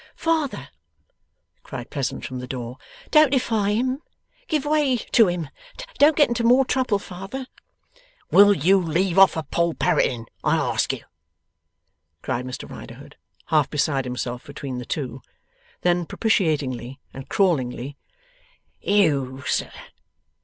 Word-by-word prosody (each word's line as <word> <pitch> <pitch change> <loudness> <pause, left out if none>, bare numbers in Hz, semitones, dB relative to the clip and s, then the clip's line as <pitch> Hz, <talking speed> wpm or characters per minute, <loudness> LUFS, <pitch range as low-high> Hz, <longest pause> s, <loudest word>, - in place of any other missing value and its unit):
'Father!' 300 - -1 0.9
cried 125 -2 -8
Pleasant, 140 -3 -3
from 130 -1 -5
the 125 - -7
door. 125 0 -6 0.3
'Don't 305 -2 +6
defy 220 -6 +1
him! 255 +5 0 0.5
Give 305 -6 0
way 295 -4 +2
to 225 -1 +3
him! 175 -5 -3 0.5
Don't 295 +2 +6
get 290 - +5
into 235 0 -1
more 250 +3 +5
trouble, 255 -5 +1
father!' 195 +7 -7 0.9
'Will 205 +1 +8
you 190 +5 +4
leave 175 +2 +1
off 195 -3 +6
a 160 - -2
Poll 170 +1 0
Parroting, 115 -2 +1 0.2
I - - +3
ask - - 0
you?' - - -6 1.2
cried 125 +1 -2
Mr 130 - -6
Riderhood, - - -11 0.4
half 150 -3 +4
beside 140 -2 0
himself 125 0 -4
between 135 -3 -6
the 125 - -7
two. 130 -3 -4 0.6
Then, 175 -1 +1
propitiatingly 145 - 0
and 135 0 -9
crawlingly: 140 -8 0 0.9
'You 140 -10 +1
sir! - - -1
170 Hz, 130 wpm, -23 LUFS, -, 1.2 s, Will